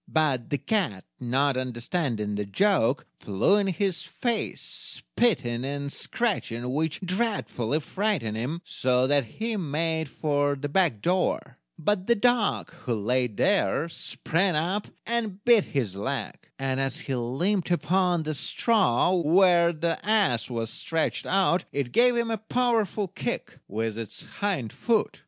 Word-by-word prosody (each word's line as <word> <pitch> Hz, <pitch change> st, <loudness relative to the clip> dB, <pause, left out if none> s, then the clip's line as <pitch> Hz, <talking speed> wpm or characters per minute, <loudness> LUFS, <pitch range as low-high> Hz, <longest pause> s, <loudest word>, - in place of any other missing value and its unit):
But 145 Hz, -7 st, +1 dB
the 145 Hz, -, 0 dB
cat, 160 Hz, -, -1 dB
not 135 Hz, +3 st, +1 dB
understanding 120 Hz, -, -2 dB
the 105 Hz, 0 st, -1 dB
joke, 135 Hz, -, +2 dB
flew 105 Hz, -, +2 dB
in 200 Hz, -1 st, +1 dB
his 190 Hz, -1 st, 0 dB
face, 235 Hz, -3 st, -2 dB
spitting 130 Hz, -, -1 dB
and 140 Hz, +1 st, -3 dB
scratching, 125 Hz, -, -2 dB
which 160 Hz, +4 st, -1 dB
dreadfully 185 Hz, -, -1 dB
frightened 185 Hz, -, -1 dB
him, 135 Hz, +10 st, -3 dB
so 125 Hz, 0 st, +2 dB
that 140 Hz, -1 st, +3 dB
he 220 Hz, -, -3 dB
made 160 Hz, -2 st, -1 dB
for 145 Hz, -1 st, 0 dB
the 145 Hz, +1 st, -4 dB
back 150 Hz, -, +1 dB
door; 180 Hz, +1 st, 0 dB, 0.2 s
but 190 Hz, +2 st, 0 dB
the 235 Hz, -, +4 dB
dog, 240 Hz, -1 st, +1 dB
who 120 Hz, -, -4 dB
laid 120 Hz, +1 st, 0 dB
there, 195 Hz, -5 st, +2 dB
sprang 170 Hz, +2 st, 0 dB
up 180 Hz, +7 st, 0 dB, 0.2 s
and 220 Hz, -4 st, -2 dB
bit 235 Hz, -4 st, +6 dB
his 115 Hz, -9 st, -2 dB
leg; 110 Hz, +3 st, -4 dB
and 135 Hz, -1 st, -1 dB
as 135 Hz, 0 st, 0 dB
he 135 Hz, -, -4 dB
limped 160 Hz, -, 0 dB
upon 175 Hz, +1 st, +2 dB
the 155 Hz, 0 st, -2 dB
straw 185 Hz, -, +2 dB
where 175 Hz, 0 st, +4 dB
the 170 Hz, +1 st, -2 dB
ass 200 Hz, -, +2 dB
was 115 Hz, -2 st, -3 dB
stretched 165 Hz, +5 st, -1 dB
out, 190 Hz, -2 st, +2 dB
it 140 Hz, -4 st, -2 dB
gave 245 Hz, -, +4 dB
him 235 Hz, -1 st, 0 dB
a 225 Hz, -, -1 dB
powerful 220 Hz, -3 st, 0 dB
kick -, -, -5 dB
with 110 Hz, +1 st, -3 dB
its 115 Hz, -3 st, -7 dB, 0.2 s
hind 180 Hz, -, -1 dB
foot. 230 Hz, -3 st, 0 dB
160 Hz, 145 wpm, -26 LUFS, 125-200 Hz, 0.2 s, bit